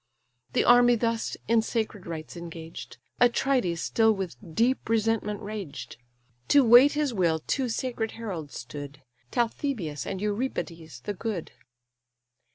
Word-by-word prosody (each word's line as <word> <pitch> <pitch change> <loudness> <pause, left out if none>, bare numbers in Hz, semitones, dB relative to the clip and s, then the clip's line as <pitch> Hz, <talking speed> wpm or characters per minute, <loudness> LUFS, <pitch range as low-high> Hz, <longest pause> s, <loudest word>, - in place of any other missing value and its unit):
The - - +3
army 245 0 +6
thus 230 0 -1
in 230 0 +4
sacred 220 -4 -3
rites 160 -1 -6
engaged, 165 -1 -8 0.2
Atrides 240 -7 +2
still 225 -1 +3
with 190 -5 -3 0.2
deep 245 0 +1
resentment 220 -2 +1
raged. 195 - -6 0.5
To 285 -1 +6
wait 245 +4 +8
his 295 -4 0
will 170 -6 +2
two 265 -3 0
sacred 230 -1 -2
heralds 180 - -6
stood, 145 +3 -8 0.3
Talthybius 230 - -2
and 190 - -3
Eurybates 180 - -3
the 205 - -3
good. 200 -4 -4
215 Hz, 125 wpm, -27 LUFS, 170-240 Hz, 0.5 s, wait